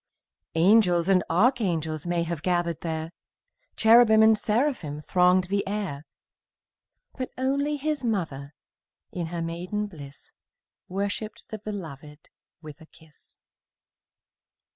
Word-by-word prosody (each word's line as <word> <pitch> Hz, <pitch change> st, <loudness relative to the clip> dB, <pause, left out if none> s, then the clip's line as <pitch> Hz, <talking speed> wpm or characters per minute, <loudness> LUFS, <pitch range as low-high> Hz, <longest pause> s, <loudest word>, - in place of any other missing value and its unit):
Angels 180 Hz, 0 st, +4 dB
and 185 Hz, -2 st, +4 dB
archangels 175 Hz, -, +1 dB
May 175 Hz, -1 st, 0 dB
have 170 Hz, -3 st, -4 dB
gathered 175 Hz, -2 st, -1 dB
there, 160 Hz, -1 st, -4 dB, 0.6 s
Cherubim 220 Hz, -1 st, +6 dB
and 220 Hz, 0 st, +6 dB
seraphim 215 Hz, -, -1 dB
Thronged 180 Hz, +3 st, +3 dB
the 200 Hz, +2 st, -1 dB
air; 195 Hz, -8 st, -4 dB, 1.1 s
But 255 Hz, -1 st, -4 dB
only 280 Hz, +3 st, 0 dB
His 295 Hz, -1 st, -2 dB
mother, 155 Hz, -, -3 dB, 0.6 s
In 175 Hz, -2 st, -4 dB
her 170 Hz, 0 st, -4 dB
maiden 180 Hz, +5 st, -3 dB
bliss, 145 Hz, -8 st, -11 dB, 0.6 s
Worshipped 200 Hz, +3 st, -4 dB
the 220 Hz, -, -6 dB
Beloved 155 Hz, -8 st, -9 dB, 0.3 s
With 155 Hz, +1 st, -11 dB
a 160 Hz, -, -14 dB
kiss. 160 Hz, -3 st, -20 dB
180 Hz, 110 wpm, -26 LUFS, 160-215 Hz, 1.1 s, Cherubim